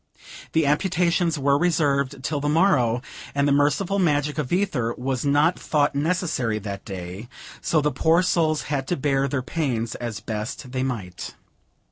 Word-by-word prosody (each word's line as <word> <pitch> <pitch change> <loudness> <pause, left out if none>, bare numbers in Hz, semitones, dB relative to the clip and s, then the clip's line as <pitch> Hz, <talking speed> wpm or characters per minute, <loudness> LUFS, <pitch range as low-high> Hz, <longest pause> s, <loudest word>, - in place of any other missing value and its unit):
The 160 -1 +3
amputations 170 +2 +1
were 140 0 +2
reserved 140 -6 +1
till 150 +1 -1
the 145 +1 -1
morrow, 140 -8 +3 0.3
and 140 0 +2
the - - +3
merciful 150 +8 +2
magic 150 -3 +1
of 140 -4 -3
ether 165 - 0
was 130 0 -2
not 145 +4 +3
thought 145 -2 +1
necessary 145 - 0
that 100 -2 -6
day, 95 +3 -7 0.3
so 155 - +2
the 150 0 +1
poor 165 +4 +3
souls 160 -4 +1
had 140 -3 -2
to 175 - 0
bear 135 -1 +1
their 130 -1 -2
pains 125 -6 -2
as 115 -4 -5
best 110 +4 -5
they 130 0 -2
might. 110 -9 -4
145 Hz, 160 wpm, -24 LUFS, 125-160 Hz, 0.3 s, The